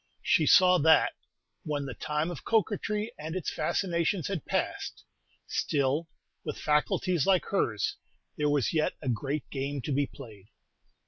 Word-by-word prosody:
She - - +3
saw 180 -1 +7
that, 160 +2 +5 0.5
when 145 -2 -3
the 135 - -5
time 150 +8 -2
of 165 - -8
coquetry 215 0 0
and 160 +3 -5
its 185 - -2
fascinations 170 -1 0
has 195 -4 -1
passed, - - -2 0.4
still, 145 +3 0 0.4
with - - -4
faculties 150 +2 +1
like 190 -2 +4
hers, 110 - 0 0.4
there 150 0 +1
was 145 -4 +1
yet 155 -1 +1
a 130 - -1
great 135 +5 -2
game 140 +1 -3
to - - -3
be 140 0 +1
played. 105 -7 -12
150 Hz, 145 wpm, -29 LUFS, 140-180 Hz, 0.5 s, saw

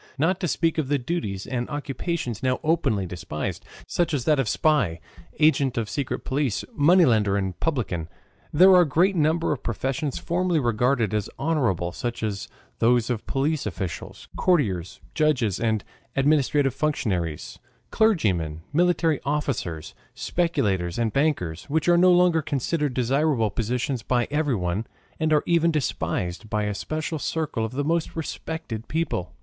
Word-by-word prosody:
Not 170 +6 +1
to 180 - -1
speak 165 +3 0
of 150 - -1
the 145 +1 +2
duties 120 - -3
and 120 -2 -3
occupations 145 - -3
now 130 -1 +1
openly 155 - +1
despised, 85 -4 -5 0.2
such 170 -3 0
as 125 -4 -2
that 150 -3 +3
of 125 -6 +1
spy, 125 - +2 0.4
agent 145 -5 +3
of 115 -2 -1
secret 140 +3 -3
police, 135 -5 -1
moneylender, 130 - +4
and 95 -2 -3
publican, 105 - -2 0.4
there 185 +5 +7
are 180 -1 +8
a 175 - +3
great 180 +8 +3
number 160 +1 +2
of 150 - -2
professions 135 +5 -2
formerly 175 -1 0
regarded 120 -2 +1
as 105 -2 -1
honorable, 120 - 0
such 120 +4 -4
as 100 -2 -3 0.3
those 120 +1 +3
of 115 -3 -4
police 145 +2 0
officials, 90 -4 -6
courtiers, 105 - +1
judges, 130 - +1
and 110 -3 0 0.3
administrative 140 -1 +2
functionaries, 95 - -2 0.3
clergymen, 95 - +1
military 165 -2 +2
officers, 125 - -2 0.2
speculators, 95 - 0
and 115 -2 0
bankers, 135 - 0
which 160 +3 -1
are 175 - +6
no 180 +1 +6
longer 175 -2 +4
considered 145 -1 -1
desirable 130 -2 +1
positions 120 +4 -2
by 120 +2 0
everyone, 115 - 0 0.3
and 155 0 +1
are 150 -1 +4
even 170 -1 +3
despised 110 - -2
by 105 0 0
a 105 0 -1
special 155 +7 -3
circle 155 -7 -2
of 110 +2 -3
the 145 +2 -1
most 165 +1 0
respected 160 -7 -5
people. 90 - -2
135 Hz, 150 wpm, -25 LUFS, 110-160 Hz, 0.4 s, are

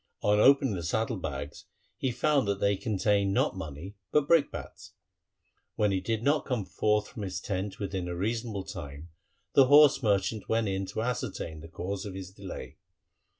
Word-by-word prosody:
On 105 0 +3
opening 135 0 +5
the 90 - -3
saddle 110 +7 -1
bags 90 - -6 0.3
he 130 - -1
found 140 -1 +2
that 100 -1 0
they 100 0 +2
contained 100 -2 +1
not - - +2
money 90 +3 -7
but 150 -1 +3
brick 165 -3 +4
bats. 100 -2 -9 0.8
When 105 -1 +2
he 95 -1 0
did 115 +3 -2
not 145 +2 +2
come 125 -7 -2
forth 105 +5 +1
from 110 - -8
his 90 -3 -3
tent 95 0 -3
within 95 -3 -3
a 90 - -3
reasonable 110 +1 -2
time, 75 -4 -8 0.4
the 135 -2 +6
horse 145 0 +7
merchant 100 -1 0
went 115 -1 +1
in 95 0 -2
to 105 +3 -3
ascertain 105 -9 -3
the 80 - -10
cause 95 +4 -5
of 95 - -7
his 95 -1 -7
delay. 95 -10 -8
100 Hz, 180 wpm, -29 LUFS, 95-115 Hz, 0.8 s, horse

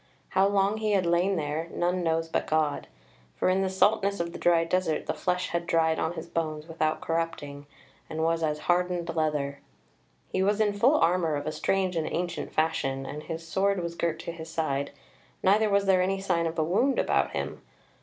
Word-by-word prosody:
How 190 +1 +3
long 200 +1 +2
he 215 -1 0
had 190 -3 +2
lain 175 +3 +2
there 155 0 -2
none 180 +1 0
knows 165 0 0
but 165 - -1
God; 155 -2 0 0.5
for - - +1
in 185 +1 +2
the 190 - 0
saltness 200 +1 +2
of 170 0 -3
the - - -7
dry 170 -1 +4
desert 165 -2 0
the - - -1
flesh 180 0 -1
had 170 0 -2
dried 160 -1 +2
on 160 - -1
his 165 -1 -6
bones 155 -2 -3
without 155 -1 -1
corrupting, 145 -4 -3 0.4
and 160 0 -2
was 165 0 +1
as 150 -1 -1
hardened 175 -1 0
leather. 150 -3 -1 0.7
He 190 - -1
was 205 +2 +2
in 210 -2 +2
full 250 +9 +4
armour 170 - +2
of 145 0 -4
a 155 - -1
strange 185 +2 0
and 160 -2 -1
ancient 175 0 -3
fashion, 135 -4 0
and 150 +2 -6
his 165 +1 -6
sword 195 +2 +1
was 170 0 -3
girt 170 -1 -1
to - - -5
his 165 -1 -9
side, 140 -4 -1 0.5
neither 210 +3 +4
was 200 0 +2
there 190 -1 +4
any 195 +1 0
sign 175 -4 0
of 165 - -5
a 160 - +2
wound 225 - +2
about - - +1
him. - - -4
170 Hz, 205 wpm, -27 LUFS, 160-190 Hz, 0.7 s, dry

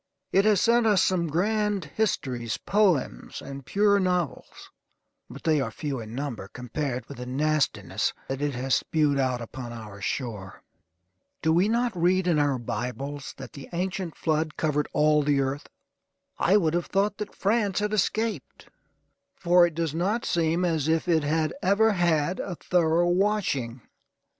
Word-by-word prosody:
It 195 +2 +4
has 210 -3 +4
sent 235 +1 +3
us 205 -3 +4
some 180 -2 +2
grand 205 +3 0
histories, 130 - -2
poems, 195 -9 0
and 140 0 -8
pure 200 0 +3
novels, 180 -6 -2 0.6
but - - -11
they 155 -3 +2
are 130 - -2
few 135 +4 -4
in 110 0 -8
number 125 -8 -4
compared 125 +3 -4
with 140 - -9
the 125 - -6
nastiness 150 +3 0 0.2
that 135 +1 -4
it 145 -2 -1
has 130 +2 -1
spewed 150 -3 +2
out 130 -2 0
upon 120 +1 -7
our 105 -4 -9
shore. 105 -3 -4 0.8
Do 160 0 +3
we 180 +5 +3
not 235 -1 0
read 180 +2 +2
in 170 -4 +2
our 145 -2 +2
Bibles 125 +5 -5
that 130 -2 -9
the 140 - -10
ancient 180 -1 -3
flood 155 -1 -1
covered 150 -2 0
all 150 0 +3
the 145 -1 +2
earth? 135 +1 -2 0.7
I 195 +4 +4
would 165 -6 +1
have 175 0 -1
thought 200 +1 0
that 210 - -6
France 205 -1 +1
had 210 0 0
escaped, 215 +2 -2 0.7
for 175 -7 +5
it 165 - -8
does 165 -3 -1
not 195 +8 -1
seem 170 +1 +1
as 160 -4 0
if 160 +2 +1
it 165 -2 +3
had 155 +2 0
ever 215 +4 +4
had 175 -2 +1
a 185 - -4
thorough 170 0 +2
washing. 175 - 0
160 Hz, 160 wpm, -26 LUFS, 135-190 Hz, 0.8 s, for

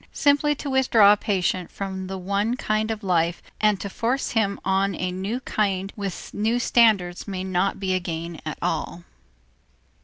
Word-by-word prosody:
Simply 290 0 +3
to 285 - -5
withdraw 230 -6 +6
a - - +3
patient 185 -3 -1
from 190 -1 -5
the 190 0 -5
one 200 +6 -1
kind 215 -1 0
of 220 -1 -4
life 175 -2 +1 0.2
and 210 -2 +3
to - - -4
force 240 +6 -2
on 195 -2 +1
him - - -10
a 185 0 -1
new 195 +7 -3
kind 195 -4 -1
with 200 -4 -6
new 220 +3 +1
standards 215 -8 +3
may 190 -2 -4
not 190 +1 0
be 190 -1 -1
a 185 - +2
gain 170 -1 -5
at - - -5
all. - - -2
200 Hz, 175 wpm, -24 LUFS, 185-220 Hz, 0.2 s, withdraw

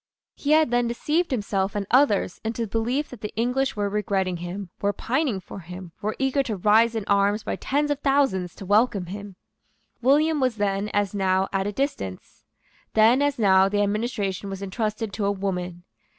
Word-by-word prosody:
He 295 +1 0
had 310 -5 +4
then 240 0 +2
deceived 300 +9 0
himself 200 -5 -1
and 205 -1 -1
others 245 -8 +3
into 225 +1 -2
the - - -3
belief 245 +6 -1
that 250 -4 -11
the 210 - -4
English 250 +4 0
were 205 -1 0
regretting 195 -3 -1
him, 175 +2 -6
were 205 0 +1
pining 255 0 -1
for 190 - -10
him, 180 0 -9
were 215 +1 -2
eager 270 +1 +1
to 235 -5 -3
rise 220 +4 +4
in 220 -3 -2
arms 205 +1 +2
by - - -2
tens 290 +2 -1
of 285 - -1
thousands 270 -11 +1
to 195 - -9
welcome 205 -1 +2
him. 200 +2 -8 0.7
William 295 +5 +3
was 255 -4 +1
then, 205 0 -1
as 205 -1 0
now, 190 -1 +1
at 195 0 0
a - - -1
distance. 205 - -4 0.5
Then, 225 +5 +5
as 285 -1 +1
now, 190 -3 +5
the 205 0 +1
administration 205 -2 -2
was 195 0 -6
entrusted 215 +1 -3
to 205 - -2
a 200 - +2
woman. 180 -3 -4
210 Hz, 190 wpm, -24 LUFS, 195-250 Hz, 0.7 s, Then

